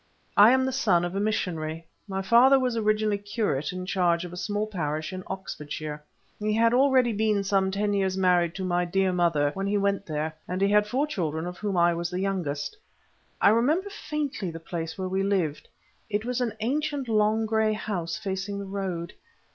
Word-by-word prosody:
I 205 +2 +8
am 260 +1 +4
the 265 - 0
son 195 -10 +2
of 175 - -4
a - - 0
missionary. 165 -6 -2 0.2
My 195 -1 -3
father 245 +7 +6
was 250 -2 0
originally 215 -1 +1
curate 205 - -2
in 185 0 -5
charge 180 -2 +1
of 175 - -9
a - - -6
small 205 +3 -2
parish 155 -5 -3
in 185 - -5
Oxfordshire. 150 -5 -6 0.4
He 210 0 0
had 230 +1 +4
already 255 -2 +4
been 210 -1 +1
some 195 -1 +2
ten 205 +2 0
years 190 -1 0
married 180 -2 +2
to 190 - -4
my 180 -1 +1
dear 190 +1 +1
mother 165 -5 +2
when 195 0 -3
he 205 +1 +1
went 200 0 0
there, 155 0 -2
and 180 +1 -3
he 195 +1 +3
had 210 0 +4
four 260 +7 +1
children, 160 - -3
of 180 0 -6
whom 205 -3 -2
I 170 0 +4
was 170 0 -2
the 180 - -3
youngest. 185 - -2 0.6
I - - +6
remember 300 - +2
faintly 290 - -3
the 165 0 -7
place 165 0 -5
where 190 -1 -3
we 190 +1 -1
lived. 190 -7 -1 0.4
It 210 +1 -1
was 250 0 -1
an 235 -4 -1
ancient 280 +2 -1
long 215 0 +2
grey 220 0 +2
house, 180 -6 -3
facing 200 -1 -4
the 200 - -5
road. 190 -3 -4
195 Hz, 200 wpm, -26 LUFS, 175-215 Hz, 0.6 s, I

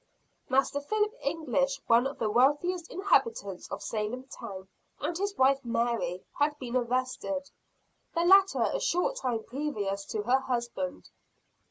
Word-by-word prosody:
Master 270 +2 +2
Philip 425 +7 0
English, 275 -3 0
one 235 +3 +4
of 275 - -7
the 220 - 0
wealthiest 295 +9 +2
inhabitants 375 - +1
of - - -5
Salem 220 +4 -3
town, 195 -8 -8 0.3
and 345 - -2
his 400 +3 -2
wife 275 +1 +4
Mary, 235 -6 -1
had 295 +1 +2
been 250 -2 -5
arrested 255 +3 -1 0.6
the 335 - +2
latter 390 +1 +6
a - - 0
short 360 +9 +1
time 235 -4 -1
previous 210 -8 -3
to 210 0 -3
her 250 +4 +3
husband. 260 +2 -3
265 Hz, 140 wpm, -29 LUFS, 235-300 Hz, 0.6 s, latter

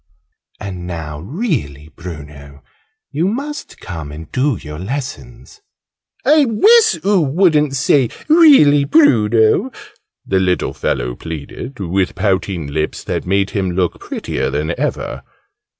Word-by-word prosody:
And 90 -4 -6
now, 80 -4 -6
really 95 - -3
Bruno, 75 -4 -11 0.5
you 155 +5 0
must 280 +8 -5
come 80 -5 -7
and 80 +1 -10
do 130 -2 0
your 75 0 -8
lessons." 125 - -7 0.6
"I 305 -1 +5
wiss 445 - +4
oo 200 -2 +3
wouldn't 150 -2 +2
say 130 -1 +2 0.2
'really 285 - +6
Bruno!'" 120 - +3 0.6
the 95 - +1
little 90 -1 0
fellow - - -2
pleaded, 80 - -8
with 95 0 -1
pouting 95 -3 -1
lips 75 +2 -3
that - - -4
made 100 +1 +1
him 95 -3 -1
look 90 -1 -1
prettier - - -3
than 75 +4 -2
ever. - - -3
100 Hz, 120 wpm, -17 LUFS, -, 0.6 s, really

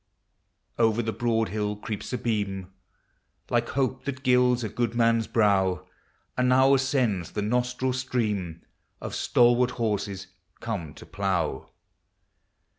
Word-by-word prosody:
Over 115 0 +3
the 110 0 -2
broad 115 -2 0
hill 105 0 -2
creeps 105 0 -6
a 125 - -1
beam, 100 -5 -3 0.8
Like 120 0 +1
hope 135 -2 -1
that 135 -1 -5
gilds 125 -1 +3
a 110 - -2
good 115 +2 -2
man's 115 -1 +2
brow; 95 -4 +2 0.5
And 125 0 +2
now 130 +2 +5
ascends 130 - 0
the 105 - -2
nostril 125 +3 0
steam 105 -10 -2 0.4
Of - - -6
stalwart 120 +1 +3
horses 100 -4 -2 0.3
come 95 -10 -5
to - - -12
plough. 95 -2 -2
115 Hz, 125 wpm, -26 LUFS, 100-125 Hz, 0.8 s, now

